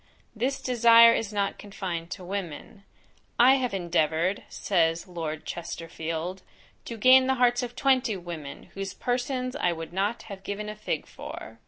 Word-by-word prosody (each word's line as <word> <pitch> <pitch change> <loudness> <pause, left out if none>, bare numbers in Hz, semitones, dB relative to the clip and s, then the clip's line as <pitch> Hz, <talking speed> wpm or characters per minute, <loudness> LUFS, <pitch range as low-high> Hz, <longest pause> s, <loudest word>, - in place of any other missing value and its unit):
This 260 +5 -1
desire 230 -1 +7
is 220 -2 -2
not 200 -1 -1
confined 180 -5 -5
to 185 - -7
women; 195 +1 -6 0.5
"I 260 +3 +7
have 250 -3 -1
endeavoured," 175 0 0
says 165 -3 0
Lord 160 -3 -5
Chesterfield, 165 +1 -5 0.4
"to 230 - -6
gain 260 +4 +6
the 265 - +2
hearts 245 0 +3
of 245 -1 -5
twenty 255 -6 +2
women, 170 -5 -8
whose 195 -1 -5
persons 255 +2 -2
I 180 -11 +1
would 165 0 -8
not 200 +5 -1
have 200 -3 -9
given 205 +2 -5
a 210 - -6
fig 215 - -3
for." - - -9
200 Hz, 155 wpm, -27 LUFS, 170-245 Hz, 0.5 s, desire